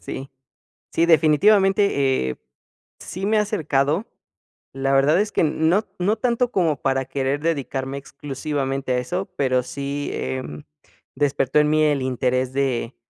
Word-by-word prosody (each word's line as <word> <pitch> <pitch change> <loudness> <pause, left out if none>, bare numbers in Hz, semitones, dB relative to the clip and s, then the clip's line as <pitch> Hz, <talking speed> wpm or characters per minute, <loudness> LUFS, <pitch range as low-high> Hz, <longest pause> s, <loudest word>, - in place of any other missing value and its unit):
Sí, 135 +1 -7 0.6
sí, 170 - +2
definitivamente, 160 - +3
eh, - - -6 0.6
sí 190 +3 -5
me 220 +1 +2
he - - +4
acercado, 160 - 0 0.7
la 135 0 -1
verdad 145 +5 +4
es 210 - -2
que - - +1
no 160 +7 +2
no 205 +5 +1
tanto 245 0 0
como 160 -7 0
para 135 -1 0
querer 135 +1 -1
dedicarme 140 -4 -2
exclusivamente 135 -1 -4
a - - +1
eso, 180 +10 -4
pero 130 -2 +2
sí, 140 +2 -4
em, 130 +3 -5 0.5
despertó 140 0 +1
en 150 - +3
mí 155 0 +3
el 145 -3 +2
interés 130 0 -1
de 130 -3 -1
140 Hz, 140 wpm, -22 LUFS, 135-170 Hz, 0.7 s, he